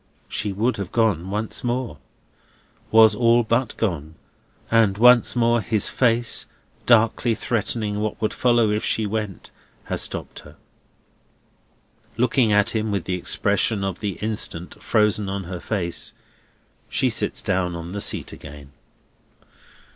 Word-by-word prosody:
She 105 - -2
would 110 +6 0
have 100 -3 -5
gone 100 -6 +1
once 105 +5 -4
more—was 110 - -1
all 120 +2 +3
but 115 +2 -1
gone—and 95 +4 -2
once 125 +2 +5
more 120 -1 +2
his 110 -1 +1
face, 120 -1 +1 0.4
darkly 115 0 +3
threatening 110 -3 -2
what 105 0 -3
would 110 -2 -1
follow 120 -3 +2
if 105 +1 -1
she 110 - +1
went, 105 -2 -4 0.3
has - - -3
stopped - - -3
her. - - -15 1.6
Looking 120 -1 +2
at 105 0 +3
him 110 -1 -1
with 100 -4 -1
the 95 - -3
expression 100 +3 0
of 95 -2 -3
the 105 -2 -2
instant 105 -5 -4
frozen 105 -2 +1
on 100 0 -3
her 90 0 -6
face, 90 -5 -3 0.8
she - - +1
sits - - -1
down 90 -2 -1
on 85 +1 -7
the 100 +1 -4
seat - - -2
again. 70 -1 -12
105 Hz, 130 wpm, -22 LUFS, 95-115 Hz, 1.6 s, once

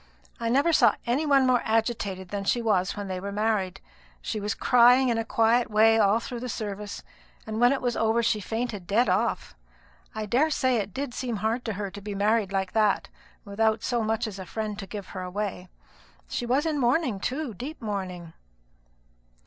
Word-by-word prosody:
I 230 -1 -1
never 280 +7 +3
saw - - +5
any 265 +6 0
one 275 -2 +5
more 255 -2 +3
agitated 220 -5 -1
than 200 0 -3
she 220 +5 +1
was 200 -5 0
when 205 -1 -4
they 185 -1 -3
were 200 +2 -5
married. 205 -3 -1 0.4
She 215 - -4
was 210 +1 -2
crying 250 +1 +5
in 230 -1 +1
a - - 0
quiet 230 +2 +2
way 220 +1 +5
all 205 +1 +4
through 240 +1 -6
the 250 +1 -5
service, 210 -2 -5 0.4
and 220 +1 -4
when 245 +1 +6
it 275 - -1
was 245 -1 0
over 225 +1 +1
she 220 -1 +1
fainted 225 -2 -4
dead 230 +5 +3
off. - - 0 0.6
I 215 0 -3
daresay 260 +1 +2
it 205 -2 -2
did 270 +3 -4
seem 245 -2 -3
hard 220 +4 -1
to 220 - -2
her 200 0 -4
to 200 +1 -9
be 205 0 -5
married 210 0 +1
like 190 -1 -1
that, 210 -2 +1 0.4
without 220 +2 0
so 240 -2 0
much 225 +2 0
as 205 -3 -6
a 190 - -6
friend 215 -2 -4
to 195 - -7
give 200 0 -7
her 185 - -6
away. 185 0 -4 0.6
She 240 - -3
was 265 +5 +2
in 310 -3 0
mourning, 245 - +1
too, 265 +3 -3
deep 270 - -7
mourning." 185 -6 -5
220 Hz, 195 wpm, -26 LUFS, 200-245 Hz, 0.6 s, when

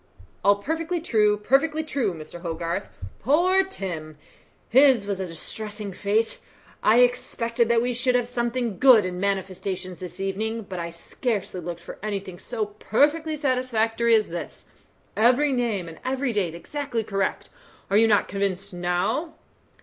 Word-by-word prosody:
"All 200 0 +6
perfectly 325 - -2
true, 210 -9 +2
perfectly 280 +9 +2
true, 275 -9 -1
Mr. 160 +2 -9
Hogarth. 165 - -3 0.3
Poor 355 - +3
Tom! 170 - -6 0.5
His 260 -4 +5
was 200 -2 -2
a 190 - -3
distressing 205 +4 -5
fate. 210 +4 0 0.4
I 225 +3 +5
expected 235 -1 +1
that 235 0 +3
we 245 0 0
should 250 +1 +1
have 245 -1 +1
something 240 -3 -2
good 250 -7 +7
in 180 0 -4
manifestations 190 -1 -3
this 180 -1 -8
evening, 220 +4 -2
but 190 -2 -6
I 170 0 -3
scarcely 185 +2 -3
looked 170 0 -6
for - - -10
anything 195 -4 -4
so 225 -3 -3
perfectly 295 +10 +1
satisfactory 235 -4 +2
as 215 -1 +2
this. 170 +1 -7 0.5
Every 255 +6 +4
name 230 -8 -1
and 165 -1 -10
every 260 -1 -1
date 180 -6 -1
exactly 265 +4 -3
correct. 195 -2 -2 0.4
Are 200 - +5
you 225 +1 +6
not 210 -2 +3
convinced 195 0 -2
now?" 180 - -1
215 Hz, 150 wpm, -25 LUFS, 190-250 Hz, 0.5 s, good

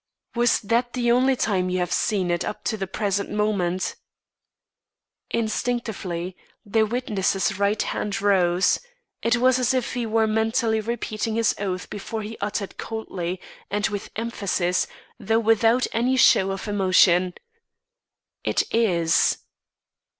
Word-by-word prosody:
"Was 240 -1 +2
that 235 +3 0
the 240 -2 +1
only 260 +2 +4
time 185 -6 0
you 180 - -1
have 180 -1 -1
seen 185 -1 +1
it 175 - 0
up - - -5
to 225 - -1
the 195 -3 -4
present 200 0 -1
moment?" 200 -4 -1 1.3
Instinctively, 215 -6 -2 0.3
the 220 +1 +2
witness's 200 -6 -1
right 200 +1 +1
hand 205 - -2
rose; 185 -3 +3 0.4
it 235 +1 +2
was 255 +1 +3
as 255 +1 +2
if 255 -2 -1
he 245 -3 -2
were 220 0 +2
mentally 220 +1 +1
repeating 220 -1 -3
his 230 0 +2
oath 185 -2 -3
before 215 +2 -5
he 220 +2 -6
uttered 200 -1 -3
coldly 185 -5 -4 0.3
and 205 +1 0
with 205 -1 -5
emphasis, 200 -5 -1 0.3
though 225 +1 +1
without 225 +2 +3
any 250 +3 +1
show 195 -5 +5
of 195 +2 -4
emotion: 185 -3 +3 1.1
"It - - +1
is." 175 -8 +3
210 Hz, 135 wpm, -24 LUFS, 190-230 Hz, 1.3 s, show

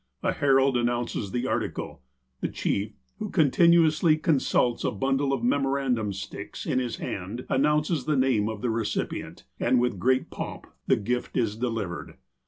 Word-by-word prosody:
A - - +2
herald 135 -2 +3
announces 120 -3 -1
the 120 +5 -2
article. 130 - -3 0.4
The - - -1
chief, 105 +2 -2 0.3
who 215 -1 -3
continuously 160 0 +4
consults 135 -6 +1
a - - +2
bundle 135 +5 0
of 135 -4 -1
memorandum 135 -4 +1
sticks 100 +1 -7
in 130 - +1
his 125 -2 -2
hand 100 +7 -5
announces 150 +3 +1
the 150 -2 +1
name 125 -5 +2
of 110 0 -6
the 120 - +1
recipient, 110 -2 -3 0.2
and 125 - +3
with 120 -6 0
great 130 +6 +1
pomp - - -6 0.2
the - - +5
gift 120 +4 -2
is 110 -3 +1
delivered. 115 -7 -4
125 Hz, 155 wpm, -26 LUFS, 110-140 Hz, 0.4 s, the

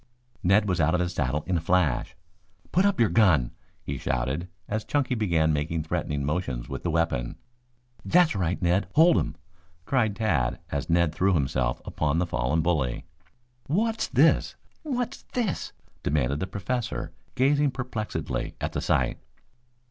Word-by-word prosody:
Ned 100 +4 +3
was 90 -3 +1
out 80 +3 +3
of - - +1
his 90 0 -1
saddle 75 -1 -1
in 90 -2 0
a - - -2
flash. 90 -1 +1 0.6
"Put 185 +3 +3
up 200 - 0
your 115 - +5
gun!" 85 - +4 0.3
he - - -4
shouted, 65 +7 -1 0.2
as 110 +1 -2
Chunky 140 0 0
began 85 -9 +2
making 75 +2 -1
threatening 75 -2 -2
motions 70 -6 -2
with - - -5
the - - -2
weapon. 80 -7 0 0.7
"That's 175 -6 +4
right, 90 -2 0
Ned. 90 +3 +2
Hold 165 +3 +6
him!" 75 - -3 0.5
cried 115 -7 +1
Tad, 75 - 0
as 70 +1 -3
Ned 85 -1 +3
threw 95 0 +2
himself 65 -3 0
upon 75 0 -1
the 90 - +2
fallen 80 -1 0
bully. 75 -8 0 0.6
"What's 220 +8 0
this? - - +3 0.3
What's 250 -6 -3
this?" 230 -8 -1 0.3
demanded 70 -1 0
the 95 - -2
Professor, 110 +5 -3 0.2
gazing 145 +2 +3
perplexedly 125 -4 -4
at - - -3
the - - -2
sight. - - +1
90 Hz, 155 wpm, -26 LUFS, 75-110 Hz, 0.7 s, Hold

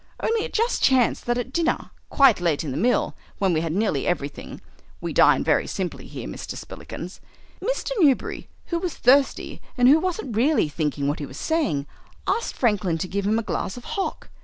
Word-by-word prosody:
Only 450 -1 0
it - - -7
just 460 +2 +1
chanced 255 -3 +3
that 240 0 +1
at 250 +2 -4
dinner, 335 -1 0 0.2
quite 270 -8 +5
late 165 -4 +1
in 145 - -4
the - - -4
meal, 235 - +1 0.2
when 190 -3 +2
we 160 - +1
had 165 -1 -2
had 170 - -1
nearly 200 -10 0
everything 145 -5 -3 0.4
(we - - -4
dine - - +5
very - - +2
simply - - -4
here, - - -7
Mr. - - -6
Spillikins), 180 +3 -8 0.4
Mr. - - -1
Newberry, 285 -7 +2 0.2
who 340 - +2
was 350 -3 -3
thirsty 270 +2 +2 0.2
and 245 0 +5
who 295 +4 +7
wasn't 325 - -3
really 265 - +3
thinking 145 -2 -1
what 145 - -1
he 145 - -4
was 135 - -10
saying, 295 - 0 0.4
asked 465 - -1
Franklin 200 -8 +1
to 175 - -3
give 200 +2 -2
him 215 +2 +2
a 230 - -1
glass 200 0 -3
of 245 - -9
hock. 395 -4 -3
230 Hz, 200 wpm, -24 LUFS, -, 0.4 s, who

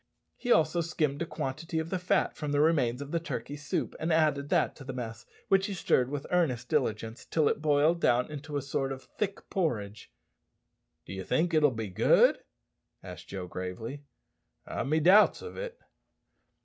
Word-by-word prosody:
He 245 - -3
also 160 -2 +4
skimmed 155 -3 -1
a 170 - -1
quantity 160 +5 -4
of 160 +1 -2
the 185 - 0
fat 185 +2 +1
from 150 -2 -4
the 145 - +2
remains 145 -5 +2
of 140 - -10
the 170 - +1
turkey 160 -3 -5
soup 150 +1 -3
and 165 +2 -1
added 150 -3 +2
that - - +2
to - - -10
the 135 - -6
mess, 115 -2 -6 0.2
which 195 +1 +3
he 200 - -4
stirred 125 -7 +2
with 145 0 -4
earnest 130 -9 +1
diligence 110 +2 -1
till 155 -3 +1
it - - 0
boiled 155 +3 +3
down 125 +1 +3
into 150 0 -5
a 140 - -3
sort 135 0 -2
of 135 -1 -6
thick 200 -1 -4
porridge. 110 - -2 0.9
"D'ye 95 0 -6
think 165 - +1
it'll 155 -2 +5
be 110 -4 -4
good?" 90 - +4 0.6
asked - - -10
Joe 95 -2 -5
gravely; 95 +10 -6 0.6
"I've - - -3
me 155 +3 +2
doubts 190 +7 +5
of 450 - -8
it." - - -6
145 Hz, 180 wpm, -29 LUFS, 125-165 Hz, 0.9 s, it'll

